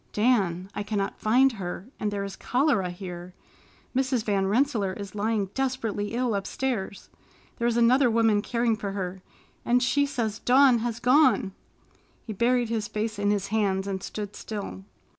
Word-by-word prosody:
"Dan, 195 -6 +1
I - - -3
cannot 200 -1 -3
find 255 +5 +4
her, 190 -4 -6
and 210 - -1
there 200 -1 -3
is 195 -1 -6
cholera 250 -6 +1
here. 180 0 -8 0.6
Mrs. 260 -3 +1
Van 195 -3 +1
Rensselaer 220 -3 +1
is 200 -1 -8
lying 210 -2 -1
desperately 235 -5 -2
ill 245 -2 0
upstairs! 200 0 -3 0.5
There 235 - +1
is 235 -1 +1
another 245 +2 +5
woman 225 -2 +3
caring 235 0 0
for 200 -2 -5
her 190 -1 -4 0.4
and 245 +1 +2
she 285 +3 +2
says 230 -6 -2
Dawn 255 -1 +5
has 230 0 -3
gone." 250 -6 +4 0.7
He 220 - -5
buried 240 +3 +1
his 225 -2 -1
face 215 0 -3
in 205 0 +1
his 200 -1 0
hands 195 -3 0
and 195 -1 -3
stood 205 0 -6
still. 200 -3 -6
215 Hz, 160 wpm, -26 LUFS, 200-245 Hz, 0.7 s, another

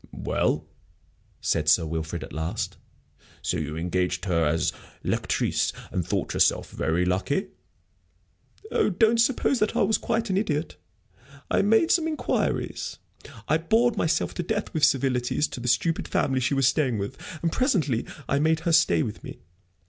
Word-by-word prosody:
"Well," - - 0 0.8
said 75 -2 +1
Sir 80 +1 +4
Wilfrid, 80 0 -4
at - - -10
last, 80 +2 -3 0.7
"so - - 0
you 75 0 -4
engaged 90 +1 -1
her 85 -4 +2
as 80 +2 +1 0.3
lectrice, - - 0 0.2
and 90 - -1
thought 85 - -2
yourself - - +2
very 80 +5 0
lucky?" 95 - 0 1.2
"Oh, - - +2
don't 225 +4 +3
suppose 260 +1 +2
that 215 - 0
I - - +3
was 220 - +2
quite 225 -2 -1
an 190 - +1
idiot. 160 -6 -1 0.8
I - - +3
made 225 - +3
some 325 -2 +3
inquiries 310 -1 -2 0.5
I 155 - +2
bored 225 +8 +2
myself 160 0 0
to - - -3
death 210 +4 -3
with 155 - -2
civilities 130 +1 +2
to - - -7
the 125 - -5
stupid 125 +8 +1
family 130 -1 +1
she 130 +3 0
was 135 -1 +2
staying 130 -4 +1
with, 100 +6 -4 0.3
and 165 - +1
presently 160 - +1 0.2
I 140 - +1
made 160 +1 +2
her 170 - 0
stay 120 - +4
with 110 0 -6
me. - - -8
140 Hz, 160 wpm, -26 LUFS, -, 1.2 s, Sir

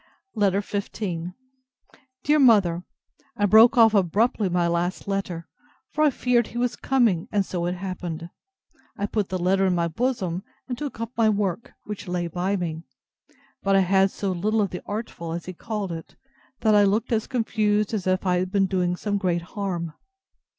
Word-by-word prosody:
LETTER 200 -2 +2
XV 200 0 -4 1.3
DEAR 300 +1 +3
MOTHER, 200 -10 +4 0.5
I 205 - +2
broke 225 +6 +7
off 225 -2 +7
abruptly 205 +2 +2
my 175 -1 +1
last 170 +3 -1
letter; 185 -4 -3 0.4
for 305 - +1
I 305 - +6
feared 245 -3 +1
he 235 - -8
was 245 0 0
coming; 235 -11 +1
and 200 -2 +1
so 175 -2 -2
it 175 - -1
happened. 175 -3 -5 0.7
I 200 - -1
put 205 -1 -1
the 185 - -1
letter 190 +2 +2
in 180 - +2
my 170 -1 +1
bosom, 185 -2 -1 0.3
and 250 - -3
took 285 -3 -6
up 230 0 -4
my 225 -1 +3
work, 205 0 -1
which 210 -1 -7
lay 180 -1 -1
by 180 +4 -1
me; 165 -4 -3 0.8
but 195 0 +2
I 195 - +5
had 190 +1 +3
so 195 0 -3
little 210 +5 +1
of 200 - -1
the 180 - -5
artful, 205 -6 -5
as 170 0 -5
he 185 - -6
called 210 0 -4
it, 165 -1 -8 0.5
that 220 -1 +4
I 205 - +6
looked 210 +5 +1
as 220 -2 0
confused 215 -4 0
as 195 -4 -2
if 185 +1 +1
I 180 -1 +2
had 185 +1 -2
been 195 -1 +3
doing 180 -2 0
some 205 +2 -2
great 175 -3 0
harm. 175 -6 -3
195 Hz, 185 wpm, -24 LUFS, 180-220 Hz, 1.3 s, broke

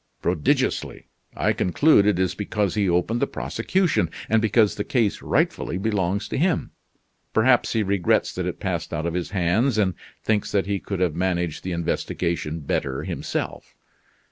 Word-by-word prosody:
"Prodigiously! 85 -4 0 0.3
I - - +1
conclude 105 - +4
it 105 - +3
is 95 0 +1
because 105 -1 -1
he 100 -3 +1
opened 90 +7 +1
the 140 - +2
prosecution, 180 - 0 0.2
and 110 0 +3
because 110 -1 +3
the 105 - -3
case 115 -4 0
rightfully 85 - 0
belongs 100 0 -1
to - - -2
him. 175 +1 +1 0.6
Perhaps 120 +2 +4
he 110 -2 +2
regrets 100 -3 +1
that - - -3
it - - -4
passed - - -3
out 80 - -2
of 85 - -1
his 90 -1 -2
hands, 100 +7 +1
and 95 -4 +2 0.3
thinks 105 -2 0
that 100 -2 +2
he 100 0 -1
could 95 -1 -4
have 90 -4 +2
managed 90 -2 -1
the 95 - -3
investigation 85 -1 -2
better 65 -1 -2
himself. - - -4
100 Hz, 165 wpm, -24 LUFS, 85-110 Hz, 0.6 s, conclude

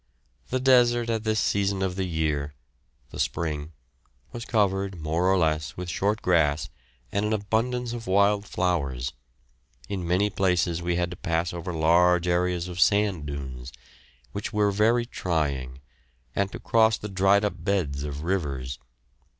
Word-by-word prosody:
The 130 - 0
desert 120 -2 +4
at 110 -1 -2
this 110 0 +1
season 100 -1 +1
of 95 -1 -1
the 95 -1 -2
year 75 -3 -1 0.6
the - - -8
spring 75 -2 -2 0.6
was 120 -1 -6
covered, 95 -4 0
more 80 +4 0
or 95 - +3
less, 75 -4 0
with 90 -1 -4
short 105 +5 0
grass 80 -3 +2 0.4
and 100 - 0
an 105 +1 0
abundance 115 +4 -1
of 115 -1 -6
wild 100 +2 +3
flowers. 70 -9 -1 0.8
In 95 -4 -3
many 95 +4 +2
places 90 -4 +1
we 85 0 0
had 90 0 -1
to 90 - -7
pass 85 -1 -1
over 85 +1 -5
large 85 +2 +3
areas 90 0 +1
of 90 -1 -7
sand 100 -8 +2
dunes, 65 -3 -6 0.6
which 100 - -4
were 105 -1 +2
very 115 +4 +2
trying, 70 - -2 0.5
and 100 0 0
to - - -6
cross 110 -1 +3
the 105 - -6
dried 100 +1 +3
up 90 -5 -4
beds 85 -8 0
of 75 0 -5
rivers. 70 -9 -2
90 Hz, 155 wpm, -26 LUFS, 80-100 Hz, 0.8 s, desert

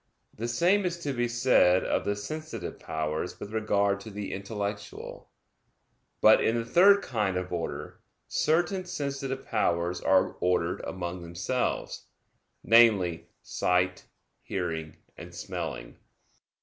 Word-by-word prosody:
The 115 - -3
same 175 - +3
is 175 -2 -1
to 140 - -1
be 120 -1 0
said 120 -7 +4
of - - -1
the 100 - 0
sensitive 155 +10 -6
powers 80 +2 -3
with 105 - -8
regard 100 -2 +1
to 100 - -9
the 100 -1 -5
intellectual. 100 +1 -6 0.9
But - - +7
in 115 - +2
the 115 - -2
third 195 +10 +6
kind 105 -6 -1
of 90 0 -4
order, 85 -1 -5 0.3
certain 175 +4 +1
sensitive 140 -5 -4
powers 85 +1 0
are 95 0 +3
ordered 90 -1 0
among 90 -1 -5
themselves, 85 +9 -3 0.6
namely, 105 -8 +4 0.2
sight, 90 0 0 0.4
hearing, 80 -4 -4 0.2
and - - -10
smelling. - - -6
100 Hz, 125 wpm, -28 LUFS, 90-130 Hz, 0.9 s, But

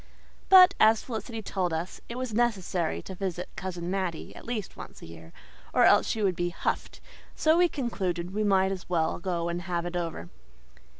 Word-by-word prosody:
But, 370 -1 +9
as 220 0 +5
Felicity 225 -1 -5
told 185 -3 -1
us, 165 +3 -4
it 235 - -5
was 255 -3 -4
necessary 195 -7 0
to 190 - -8
visit 180 -2 -4
Cousin 180 -2 -4
Mattie 185 -4 -3
at - - -11
least 225 -5 -4
once - - -11
a - - -8
year, 80 0 -12 0.4
or - - +5
else - - +5
she 220 - -1
would 190 -3 +2
be 175 0 -1
"huffed," 170 - -3 0.4
so 315 +1 +3
we 350 0 +4
concluded 185 - -3
we 215 +1 0
might 190 -2 +3
as 185 -2 -6
well 165 -2 0
go 175 -2 -2
and 170 +1 -3
have 175 -1 -3
it 175 0 -5
over. 165 - -4
185 Hz, 190 wpm, -28 LUFS, 175-220 Hz, 0.4 s, But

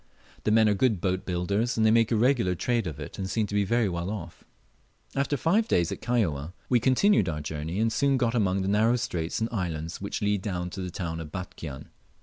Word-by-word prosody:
The 105 - +3
men 110 0 +5
are 105 - +4
good 105 -1 +2
boat 95 +1 -1
builders, 100 +7 0
and 110 - +3
they 110 - +5
make 115 0 +3
a - - +3
regular 115 -5 +2
trade 115 +2 0
of 75 -2 -6
it 75 - -8
and 95 -1 -3
seem 110 +1 0
to 100 - -8
be 105 0 +3
very 115 +2 +2
well 85 0 -3
off. 90 -6 -7 0.7
After 140 +1 0
five 205 +10 +2
days 85 -1 +2
at - - -5
Kaióa 90 - 0 0.2
we 125 - +4
continued 130 - +3
our 75 -2 -3
journey, 80 +5 -4
and 110 0 +1
soon 140 +3 +2
got 120 -3 +1
among 95 -5 +1
the - - -2
narrow 110 +4 +3
straits 90 -7 -2
and 115 - 0
islands 85 -6 -3
which 100 +2 -3
lead 105 -1 +1
down 90 -3 -3
to 95 - -5
the 90 - -4
town 85 -2 -4
of 80 -2 -7
Batchian. 80 -6 -7
100 Hz, 230 wpm, -27 LUFS, 90-115 Hz, 0.7 s, men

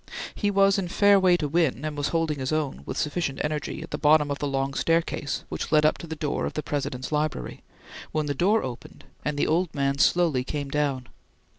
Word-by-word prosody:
He 205 - 0
was 195 0 +4
in 185 - -2
fair 200 +3 +5
way 180 -2 +4
to 150 - -2
win, 150 -3 +1
and 155 -1 -3
was 145 -1 -1
holding 165 -3 -1
his 130 +1 -2
own, 155 - -1
with - - -4
sufficient 150 -2 -2
energy, 150 +1 -3
at 165 - -11
the - - -3
bottom 150 -1 +4
of 140 - -3
the 145 - -1
long 135 0 -1
staircase 165 -2 0
which - - -5
led 155 -1 +5
up 155 - +2
to 170 - -8
the 160 - -5
door 150 -2 -2
of - - -6
the 155 - -3
President's 130 -3 -3
library, 150 0 -2 0.5
when 155 -1 -1
the 145 - -1
door 200 +10 +2
opened, 125 -2 -8 0.2
and 150 -1 -2
the - - +2
old 170 +1 0
man 140 0 0
slowly 165 -8 +3
came 145 +1 -4
down. 140 -3 -1
150 Hz, 225 wpm, -26 LUFS, 140-165 Hz, 0.5 s, fair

